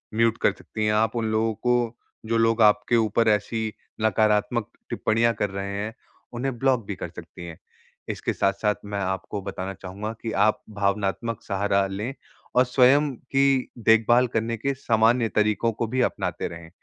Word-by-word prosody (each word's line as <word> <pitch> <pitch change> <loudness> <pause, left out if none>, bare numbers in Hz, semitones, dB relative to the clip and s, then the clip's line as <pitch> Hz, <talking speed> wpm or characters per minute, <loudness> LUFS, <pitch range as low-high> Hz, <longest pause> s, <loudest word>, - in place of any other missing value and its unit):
Mute 115 0 +3
कर - - +4
सकती 110 -1 -5
हैं, 105 - +2
आप 110 +2 +1
उन 115 - 0
लोगों 110 +1 +1
को, 120 +1 0 0.3
जो 115 +1 0
लोग 115 0 +2
आपके 105 +2 +4
ऊपर 110 +1 +2
ऐसी 110 +1 0 0.3
नकारात्मक 110 +1 +2 0.2
टिप्पणियाँ 115 +1 +1
कर 105 - -1
रहे 100 0 -4
हैं, 105 +2 -4 0.4
उन्हें 125 0 -3
ब्लॉक 130 -5 +2
भी 100 - -3
कर - - -6
सकती 85 - -10
हैं। 85 -2 -9 0.5
इसके - - -2
साथ-साथ 105 +2 +1
मैं 100 -1 -4
आपको 95 +1 -3
बताना 95 0 -5
चाहूँगा 100 +4 -6
कि 115 - -3 0.2
आप 110 - 0
भावनात्मक 100 +2 -1
सहारा 100 0 +1
लें 105 +7 -4 0.4
और 125 +1 +5
स्वयं 135 +3 +4
की 135 +1 +1
देख-भाल 115 +3 +5
करने 115 +1 0
के 140 +5 -1
सामान्य 115 -1 +2
तरीकों 105 +2 +2
को 115 +1 -2
भी 130 +3 0
अपनाते - - -3
रहें। 85 -1 -10
110 Hz, 170 wpm, -25 LUFS, 100-115 Hz, 0.5 s, और